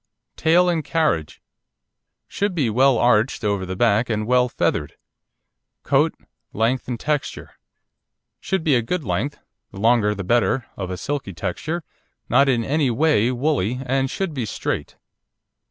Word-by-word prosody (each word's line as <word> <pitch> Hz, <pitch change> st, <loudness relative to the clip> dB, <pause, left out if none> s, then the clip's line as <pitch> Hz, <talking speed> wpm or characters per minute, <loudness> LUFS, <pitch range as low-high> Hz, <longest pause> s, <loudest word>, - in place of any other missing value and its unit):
TAIL 170 Hz, +3 st, +3 dB
AND 170 Hz, -3 st, 0 dB
CARRIAGE 150 Hz, -, -1 dB, 0.8 s
Should 200 Hz, -2 st, -2 dB
be 135 Hz, -9 st, +1 dB
well 130 Hz, +2 st, +4 dB
arched 120 Hz, 0 st, +2 dB
over 100 Hz, -3 st, -1 dB
the 95 Hz, -, -4 dB
back 105 Hz, +6 st, +2 dB
and 110 Hz, -1 st, -1 dB
well 125 Hz, +1 st, +3 dB
feathered. -, -, -1 dB, 0.9 s
COAT, -, -, +2 dB, 0.4 s
LENGTH 115 Hz, +4 st, 0 dB
AND 120 Hz, -2 st, -4 dB
TEXTURE 150 Hz, 0 st, -3 dB, 0.9 s
Should 190 Hz, -4 st, -2 dB
be 155 Hz, -4 st, +3 dB
a 120 Hz, -, +3 dB
good 160 Hz, +9 st, -3 dB
length, 110 Hz, +8 st, -2 dB, 0.3 s
the 95 Hz, -, -10 dB
longer 110 Hz, -1 st, +3 dB
the 100 Hz, -, -5 dB
better, 120 Hz, +4 st, +1 dB
of 95 Hz, -2 st, -5 dB
a 90 Hz, -, -4 dB
silky 135 Hz, -2 st, -4 dB
texture, 160 Hz, -, -3 dB, 0.5 s
not 140 Hz, 0 st, +4 dB
in 120 Hz, -3 st, +2 dB
any 145 Hz, +2 st, +1 dB
way 125 Hz, -3 st, +2 dB
woolly, 125 Hz, -3 st, 0 dB
and 135 Hz, +1 st, 0 dB
should 190 Hz, +2 st, -3 dB
be 130 Hz, -5 st, -3 dB
straight. -, -, -4 dB
125 Hz, 150 wpm, -22 LUFS, 105-150 Hz, 0.9 s, well